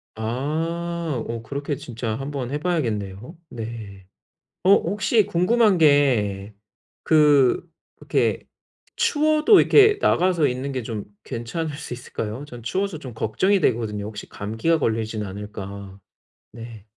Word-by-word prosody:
아. 155 +5 -2
어 115 0 -4
그렇게 140 +5 -4
진짜 115 -3 -5
한번 135 -1 -4
해 145 - -2
봐야겠네요. 120 - -3
네. 110 -4 -8 0.6
어 190 - +5
혹시 205 +3 +2
궁금한 205 +4 +3
게 120 - +3 0.5
그 150 -4 +5 0.4
이렇게 - - 0 0.5
추워도 310 +6 +4
이렇게 420 -1 +6
나가서 175 -4 +3
있는 130 +3 -3
게 130 - -3
좀 110 -3 -5 0.2
괜찮을 145 +7 -4
수 125 - -6
있을까요? 120 +1 -6
저는 120 -5 -11
추워서 190 - -2
좀 130 -4 -9
걱정이 185 - +1
되거든요, 110 -5 0
혹시 105 0 -8
감기가 110 +11 -1
걸리진 110 -3 -1
않을까. 100 0 -8 0.5
네. 115 -3 -10
130 Hz, 260 characters per minute, -23 LUFS, 110-165 Hz, 0.6 s, 이렇게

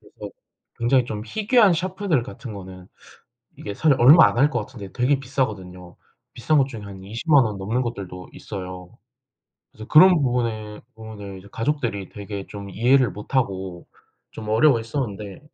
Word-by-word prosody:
그래서 - - -11 0.5
굉장히 120 +1 +3
좀 105 -3 -5
희귀한 215 - +3
샤프들 180 - -1
같은 125 -1 -9
거는 95 -2 -10 0.7
이게 100 - -6
사실 145 +3 +2
얼마 145 +7 +8
안 - - -3
할 145 +4 +4
것 - - -1
같은데 100 -5 -9
되게 130 +3 +1
비싸거든요. 100 -10 -4 0.4
비싼 140 +4 +1
것 135 -1 +3
중에 115 -6 -8
한 95 -2 -10
200,000 125 - +2
원 105 -3 -3
넘는 110 +6 -1
것들도 95 -7 -6
있어요. 90 +1 -8 0.7
그래서 110 +1 -11
그런 180 +4 +7
부분에 115 -4 -2
부분을 105 -3 -9
이제 95 - -15
가족들이 115 - -2
되게 100 -1 -7
좀 100 -1 -9
이해를 125 +5 +3
못하고 95 -6 -3 0.4
좀 110 -1 -8
어려워했었는데 115 -4 0
115 Hz, 330 characters per minute, -23 LUFS, 100-135 Hz, 0.7 s, 얼마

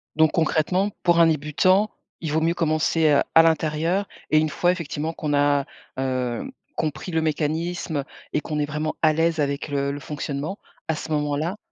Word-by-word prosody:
Donc 160 0 +4
concrètement, 170 +4 +1
pour 175 -1 +4
un 165 - +7
débutant, 165 +7 +2 0.3
il 160 -3 -3
vaut 160 +1 +1
mieux 165 +1 +2
commencer 155 -2 +2
à 165 - +9
l'intérieur 165 +4 +1 0.2
et 155 - +5
une 155 0 +1
fois, 175 +4 +2
effectivement, 160 -2 -3
qu'on 150 -2 -3
a, 145 -1 +3 0.3
heu, 130 - -2 0.3
compris 155 +2 -3
le 160 -1 +1
mécanisme 160 0 -1 0.3
et 150 - +1
qu'on 150 -1 -3
est 145 - +1
vraiment 155 +1 -3
à 155 -1 +5
l'aise 165 +1 +1
avec 140 0 -1
le 140 -1 -1
le 145 - -5
fonctionnement, 150 +4 -4 0.3
à 160 - 0
ce 160 - -6
moment-là? 150 +5 -1
155 Hz, 175 wpm, -24 LUFS, 145-165 Hz, 0.3 s, à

